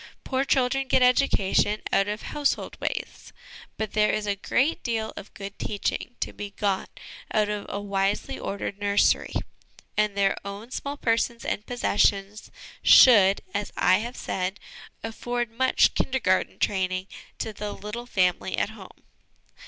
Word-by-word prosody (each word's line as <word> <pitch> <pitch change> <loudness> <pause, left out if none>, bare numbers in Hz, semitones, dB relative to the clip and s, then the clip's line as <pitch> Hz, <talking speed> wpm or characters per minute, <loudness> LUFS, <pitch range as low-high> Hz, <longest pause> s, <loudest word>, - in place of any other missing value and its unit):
Poor 265 0 0
children 270 0 +1
get 260 - +4
education 215 -5 +3
out 195 - +3
of 210 +1 -4
household 295 -1 -1
ways; - - -4 0.5
but 220 -2 -3
there 210 0 +3
is 215 - -1
a 205 -1 0
great 270 - 0
deal 225 -2 -2
of 205 - -9
good 200 0 -8
teaching 210 +3 -3
to - - -3
be 205 - -6
got 200 -1 -1 0.4
out 210 -1 +2
of 210 -1 -3
a 200 - -3
wisely 200 0 -1
ordered 200 0 -4
nursery, 205 0 +2 0.6
and 210 -1 +1
their 195 -1 +3
own 200 +4 -8
small 280 +2 -4
persons 230 -1 0
and 210 - -3
possessions 205 -3 +1 0.3
should, 200 -6 +7
as 205 0 -2
I 185 +2 +4
have 240 +3 -6
said, 185 +1 -3 0.4
afford 240 +1 -3
much 260 +3 +3
'Kindergarten' 235 -8 0
training 185 -1 0 0.3
to 220 - -4
the 210 0 -5
little 230 +5 -7
family 185 -6 +1
at - - 0
home. - - -13
210 Hz, 145 wpm, -26 LUFS, 200-240 Hz, 0.6 s, should